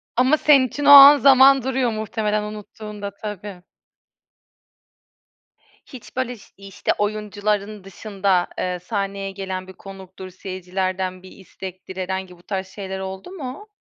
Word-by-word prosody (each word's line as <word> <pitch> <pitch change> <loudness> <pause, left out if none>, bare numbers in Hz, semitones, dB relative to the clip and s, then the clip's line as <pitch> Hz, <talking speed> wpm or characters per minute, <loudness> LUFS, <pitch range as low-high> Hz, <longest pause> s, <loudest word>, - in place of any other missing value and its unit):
Ama 260 +5 +3
senin 275 -4 +4
için 290 +4 -5
o 285 - +5
an 285 +1 +11
zaman 270 -1 +6
duruyor 260 -2 0
muhtemelen, 215 -1 -2
unuttuğunda 210 -1 -8
tabii. 205 -3 -7 2.2
Hiç 255 -4 -13
böyle 255 -1 -2
şiy - - -19 0.2
işte 195 - -2
oyuncuların 210 -1 -2
dışında, 195 -2 -1
eee, 180 -1 -2
sahneye 195 0 -4
gelen 190 -1 -6
bir 190 - -11
konuktur, 190 -1 -11
seyircilerden 185 0 -4
bir 185 - -13
istektir, 190 -1 -11
herhangi 185 -1 -5
bu 175 - -22
tarz 190 -2 -4
şeyler 190 0 -7
oldu 190 - -7
mu? 295 +3 -8
200 Hz, 130 wpm, -21 LUFS, 190-230 Hz, 2.2 s, an